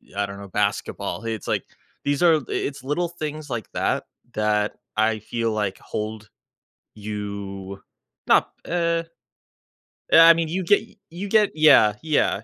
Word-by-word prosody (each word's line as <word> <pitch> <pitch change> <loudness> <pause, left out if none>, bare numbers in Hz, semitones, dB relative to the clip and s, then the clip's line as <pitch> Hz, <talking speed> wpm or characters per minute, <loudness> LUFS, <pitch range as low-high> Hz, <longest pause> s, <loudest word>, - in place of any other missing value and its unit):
I 100 0 0
don't 100 0 -8
know, 100 -1 -10
basketball." 105 -1 -2
It's 110 -2 -4
like, - - 0 0.4
these 145 -1 0
are 170 -2 +6
i - - -4
it's 140 -2 -3
little 150 +6 -1
things 155 -3 -6
like 120 -4 -5
that, - - 0 0.3
that 105 -1 +1 0.2
I 110 0 +2
feel 115 +2 -2
like 105 -3 -2
hold 110 0 -5 0.7
you 100 -2 -6 0.5
not - - +4
eh 170 -1 0 1.1
Eh, - - +8
I 165 0 +9
mean, 165 0 -1
you 185 +4 -2
get 205 +4 +4 0.3
you 180 +5 -6
get 210 0 +4
Yeah, 150 -9 +6
yeah. 155 -2 +2
115 Hz, 150 wpm, -23 LUFS, 105-165 Hz, 1.1 s, I